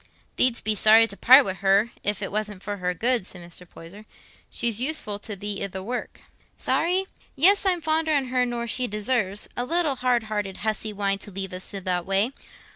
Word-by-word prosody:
"Thee'dst 250 -2 +2
be 215 - +2
sorry 220 +2 +6
to 200 - -9
part 260 +6 +7
wi' 190 - -2
her, 200 +4 +2
if 205 0 0
it 195 - -4
wasn't 210 -2 -3
for 205 0 -4
her 180 -1 -2
good," 235 0 0
said 180 - -8
Mr. 175 0 -9
Poyser. 195 +6 -13 0.4
"She's 230 -1 0
useful 255 -8 -2
to 210 0 -6
thee 200 +1 -4
i' - - -1
the 190 0 -7
work." 245 +5 -5 0.4
"Sorry? 365 +3 0 0.3
Yes, 390 +7 +5
I'm 360 -2 +2
fonder 315 0 0
on 270 -3 0
her 250 0 +1
nor 240 -1 -3
she 250 +2 0
deserves—a 210 +1 -2
little 310 0 +1
hard 245 -2 +1
hearted 210 -3 -4
hussy, 220 0 -1
wanting 200 -1 -1
to 205 - -11
leave 195 -1 -5
us 185 +1 -5
i' - - -3
that 180 -1 -2
way. 195 +5 +2
215 Hz, 200 wpm, -24 LUFS, 195-250 Hz, 0.4 s, part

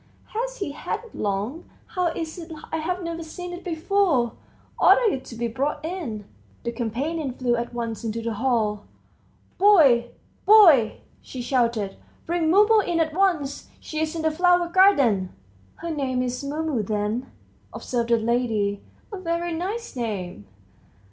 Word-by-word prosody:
Has - - -3
he 390 -10 -3
had 295 - -4
it 470 - -15
long? 210 - -3 0.2
How 360 -1 -1
is 325 0 -4
it 335 0 -9 0.2
I've 355 +3 -2
never 335 0 -4
seen 355 +2 -7
it 350 - -8
before?... 330 - +1 0.5
Order 475 -4 +5
it 260 - -4
to 235 - -9
be 235 +1 -2
brought 275 +7 -2
in." 295 - -5 0.4
The 235 - -2
companion 260 +5 -3
flew 245 -1 0
at 235 0 -3
once 230 -2 -4
into 225 0 -3
the 230 0 -3
hall. 215 -3 0 0.7
"Boy, 290 -13 +6 0.4
boy!" 335 - +7 0.2
she 255 -2 -7
shouted; 235 -6 0 0.3
"bring 335 -1 0
Mumu 420 +5 +6
in 345 -4 0
at 315 -1 +1
once! 325 -7 0
She's 310 +1 -3
in 325 - -3
the 315 - +2
flower 350 +1 +3
garden." 275 - +4 0.4
"Her 335 - -5
name's 255 -3 -2
Mumu 295 -3 -1
then," 210 +4 -2 0.4
observed 235 -2 -3
the 235 - +4
lady; 220 -3 0 0.3
"a 395 - -4
very 340 -1 -2
nice 395 +7 -4
name." 190 - -4
285 Hz, 150 wpm, -24 LUFS, 235-345 Hz, 0.7 s, boy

